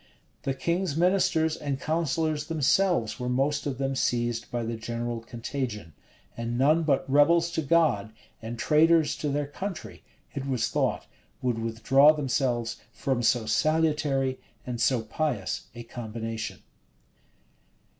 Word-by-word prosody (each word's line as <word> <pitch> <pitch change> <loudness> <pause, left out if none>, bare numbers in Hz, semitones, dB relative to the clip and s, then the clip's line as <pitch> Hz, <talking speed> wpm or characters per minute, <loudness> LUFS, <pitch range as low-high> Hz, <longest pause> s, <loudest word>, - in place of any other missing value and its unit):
The 135 - -2
king's 170 +3 -1
ministers 175 -3 +2
and 140 -4 -3
counsellors 155 -1 -1
themselves 165 - +1
were 125 0 -2
most 140 +3 0
of 135 -3 -3
them 135 0 -1
seized 120 -2 -1
by 120 -1 -2
the 115 +1 -3
general 115 +1 -4
contagion. 115 - -5 0.4
And 115 0 -3
none 150 +6 +4
but 145 -5 +1
rebels 165 +5 +4
to 165 - -1
God, 145 -9 +2 0.3
and 115 +1 -6
traitors 160 +3 +4
to 150 - -2
their 145 +1 0
country, 185 +5 -6 0.3
it 140 -1 -4
was 125 -4 0
thought, - - 0 0.4
would 120 -3 0
withdraw 125 +6 +4
themselves 130 -5 -1
from 130 -1 -1
so 120 -1 +2
salutary 150 0 +1 0.3
and 120 -2 -4
so 120 0 +2
pious 120 -3 -2
a 120 - -7
combination. 115 -1 -6
135 Hz, 135 wpm, -27 LUFS, 120-155 Hz, 0.4 s, none